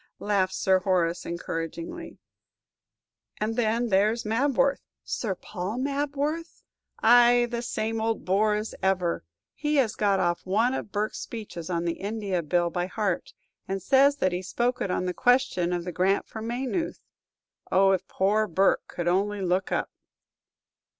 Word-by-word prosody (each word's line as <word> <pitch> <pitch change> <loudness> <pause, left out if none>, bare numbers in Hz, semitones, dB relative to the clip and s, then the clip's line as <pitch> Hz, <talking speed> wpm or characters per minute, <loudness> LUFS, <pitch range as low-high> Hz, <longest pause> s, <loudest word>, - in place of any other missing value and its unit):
laughed 195 -2 0
Sir 190 -1 +3
Horace, 180 -2 0
encouragingly. 180 - -5 1.2
"And 215 +1 -1
then 235 0 +1
there's 215 +4 +2
Mabworth." 270 +4 +2 0.2
"Sir 205 -5 -2
Paul 195 +4 -5
Mabworth?" 285 +4 -2 0.4
"Ay, 240 +1 +6
the 235 -1 -2
same 225 -2 -2
old 225 0 -1
bore 210 +3 +2
as 215 +1 -3
ever! 185 -3 0 0.3
He 300 0 -1
has 250 -6 +3
got 200 -2 +1
off 175 -1 0
one 220 +7 +2
of 215 - -4
Burke's 210 +1 -2
speeches 195 -7 -7
on 170 -1 -1
the 170 - -2
India 200 -3 -2
Bill 170 +2 +1
by 175 +1 -1
heart, 195 -2 -2 0.3
and 195 0 -2
says 275 +8 +4
that 185 -10 +1
he 180 +1 -2
spoke 240 +6 -1
it - - -1
on 180 - -1
the 180 - -1
question 245 -7 +2
of 175 -1 -1
the 180 - -4
grant 185 +3 +1
for 220 - -8
Maynooth. 255 +9 -2 0.7
Oh, 195 +1 +5
if 190 - 0
poor 210 +3 +1
Burke 190 +2 +2
could 175 -1 -4
only 200 +3 +1
look 185 +1 0
up!" - - -1
205 Hz, 155 wpm, -26 LUFS, 185-240 Hz, 1.2 s, Ay